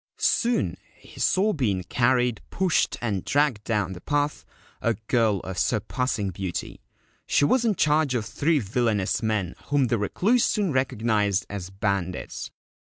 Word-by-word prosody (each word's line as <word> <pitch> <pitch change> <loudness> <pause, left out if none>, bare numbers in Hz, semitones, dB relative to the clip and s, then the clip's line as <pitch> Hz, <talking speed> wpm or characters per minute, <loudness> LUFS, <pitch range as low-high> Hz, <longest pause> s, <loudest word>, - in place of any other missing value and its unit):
Soon 100 - +1 0.2
he - - -15
saw 210 +3 +2
being 105 - 0
carried, 125 +1 +1
pushed, 185 -3 +1
and 105 -6 -1
dragged 135 -6 +1
down 105 -5 -1
the 90 - -10
path, 145 - -1 0.3
a 115 -1 +1
girl 110 -3 +1
of 95 -1 -5
surpassing 110 -2 -1
beauty. 90 -1 -5 0.5
She 145 - +3
was 240 - +2
in 215 -3 +2
charge 150 -4 +2
of 115 -3 -1
three 155 +8 +1
villainous 110 -4 0
men 105 -5 -1
whom 140 -4 +1
the 120 - +1
Recluse 210 - +2
soon 200 -5 +1
recognised 110 -6 +1
as 95 -3 -5
bandits. 95 -2 -3
115 Hz, 145 wpm, -25 LUFS, 100-145 Hz, 0.5 s, She